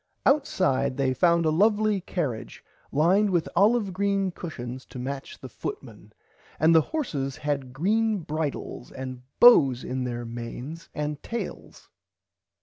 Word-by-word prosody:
Outside 185 Hz, -, +2 dB
they 135 Hz, -2 st, +1 dB
found 170 Hz, +4 st, +3 dB
a 155 Hz, -, +3 dB
lovely 210 Hz, +3 st, +2 dB
cariage 150 Hz, -11 st, -4 dB, 0.3 s
lined 185 Hz, +8 st, +3 dB
with 175 Hz, -3 st, +1 dB
olive 210 Hz, -1 st, +3 dB
green 195 Hz, 0 st, 0 dB
cushons 130 Hz, -8 st, -7 dB
to -, -, -10 dB
match 135 Hz, +2 st, -5 dB
the -, -, -9 dB
footman -, -, -8 dB, 0.5 s
and 160 Hz, +2 st, +5 dB
the 160 Hz, -, +7 dB
horses 145 Hz, -, -3 dB
had 140 Hz, -3 st, -2 dB
green 215 Hz, -, +1 dB
bridles 155 Hz, -5 st, -4 dB
and 130 Hz, -1 st, -7 dB, 0.2 s
bows 135 Hz, -, +7 dB
on 130 Hz, 0 st, -2 dB
their 120 Hz, -1 st, -4 dB
manes 120 Hz, +7 st, -7 dB
and 150 Hz, -1 st, -3 dB
tails. 235 Hz, 0 st, -7 dB
155 Hz, 135 wpm, -26 LUFS, 130-195 Hz, 0.5 s, the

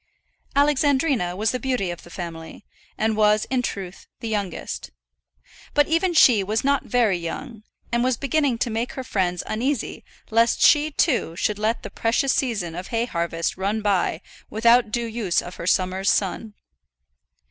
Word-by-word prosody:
Alexandrina 280 Hz, -, +2 dB
was 210 Hz, +3 st, 0 dB
the 255 Hz, -, -3 dB
beauty 250 Hz, -9 st, -1 dB
of 175 Hz, -, -8 dB
the -, -, -15 dB
family, 170 Hz, 0 st, -8 dB, 0.3 s
and 220 Hz, 0 st, +1 dB
was 210 Hz, 0 st, +3 dB
in 255 Hz, -1 st, +2 dB
truth 195 Hz, -6 st, -6 dB
the 230 Hz, -, -5 dB
youngest. 205 Hz, -5 st, -4 dB, 0.9 s
But 290 Hz, 0 st, +4 dB
even 335 Hz, +2 st, +1 dB
she 235 Hz, -9 st, +6 dB
was 215 Hz, +3 st, -1 dB
not 280 Hz, 0 st, +1 dB
very 225 Hz, -7 st, +2 dB
young, 215 Hz, +7 st, -6 dB, 0.3 s
and 235 Hz, 0 st, +1 dB
was 255 Hz, -1 st, +1 dB
beginning 280 Hz, -2 st, +1 dB
to 235 Hz, -, -4 dB
make 230 Hz, +3 st, -2 dB
her 260 Hz, -, -5 dB
friends 180 Hz, -6 st, -1 dB
uneasy 250 Hz, +3 st, -2 dB, 0.3 s
lest 230 Hz, +1 st, +3 dB
she, 300 Hz, 0 st, +5 dB
too, 270 Hz, -, 0 dB
should 210 Hz, +3 st, -1 dB
let 220 Hz, +2 st, 0 dB
the -, -, -7 dB
precious 245 Hz, +4 st, +1 dB
season 210 Hz, -11 st, -1 dB
of 180 Hz, +3 st, -6 dB
hay 230 Hz, 0 st, 0 dB
harvest 170 Hz, -5 st, -2 dB
run 205 Hz, +3 st, -1 dB
by 195 Hz, -4 st, +1 dB, 0.3 s
without 235 Hz, +1 st, +4 dB
due 235 Hz, +2 st, -1 dB
use 220 Hz, -6 st, 0 dB
of 175 Hz, -, -7 dB
her 170 Hz, -, -6 dB
summer's 185 Hz, +1 st, +1 dB
sun. 205 Hz, +2 st, -1 dB
220 Hz, 165 wpm, -23 LUFS, 190-255 Hz, 0.9 s, she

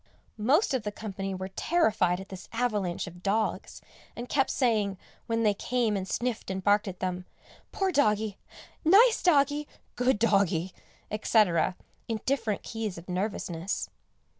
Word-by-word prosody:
Most 275 Hz, -, +3 dB
of 260 Hz, -, +1 dB
the 210 Hz, 0 st, -4 dB
company 195 Hz, -2 st, -5 dB
were 185 Hz, +1 st, -5 dB
terrified 210 Hz, -, +1 dB
at 190 Hz, -, -9 dB
this 190 Hz, -2 st, -9 dB
avalanche 210 Hz, -7 st, -1 dB
of 175 Hz, -1 st, -11 dB
dogs, 210 Hz, +3 st, -1 dB, 0.3 s
and 240 Hz, +1 st, -6 dB
kept 270 Hz, 0 st, +1 dB
saying, 215 Hz, -7 st, +1 dB, 0.3 s
when 230 Hz, 0 st, 0 dB
they 210 Hz, -2 st, +4 dB
came 235 Hz, +1 st, 0 dB
and 190 Hz, -1 st, -3 dB
sniffed 240 Hz, +1 st, -2 dB
and 190 Hz, 0 st, -3 dB
barked 205 Hz, +1 st, +3 dB
at 185 Hz, -1 st, -7 dB
them, 180 Hz, -1 st, -2 dB, 0.5 s
"poor 385 Hz, -1 st, 0 dB
doggie," 215 Hz, -, +1 dB, 0.4 s
"nice 435 Hz, +8 st, +6 dB
doggie," 290 Hz, -3 st, +3 dB, 0.3 s
"good 250 Hz, -1 st, +2 dB
doggie," 195 Hz, -5 st, +2 dB, 0.4 s
etc., 205 Hz, -5 st, +2 dB, 0.3 s
in 225 Hz, -1 st, -2 dB
different 230 Hz, -6 st, 0 dB
keys 220 Hz, -5 st, -4 dB
of 170 Hz, -, -11 dB
nervousness. 180 Hz, -2 st, -3 dB
210 Hz, 145 wpm, -28 LUFS, 190-245 Hz, 0.5 s, nice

